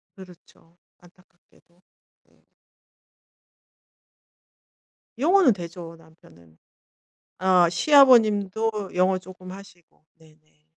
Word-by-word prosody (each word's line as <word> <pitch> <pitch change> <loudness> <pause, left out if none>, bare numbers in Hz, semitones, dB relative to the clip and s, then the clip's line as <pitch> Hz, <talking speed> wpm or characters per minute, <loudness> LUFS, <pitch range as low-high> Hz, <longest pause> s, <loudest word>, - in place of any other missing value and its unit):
그렇죠. 180 -2 -19 0.2
안타깝게도. 175 0 -28 0.4
네. - - -35 2.8
영어는 330 - +2
되죠 170 -2 -11
남편은. 85 - -23 0.8
아 185 -2 +2
시아버님도 220 - +2
영어 185 +1 +1
쪼금 185 0 -14
하시고. 185 -5 -17
네네. 155 -1 -27
185 Hz, 180 characters per minute, -22 LUFS, 165-200 Hz, 2.8 s, 영어는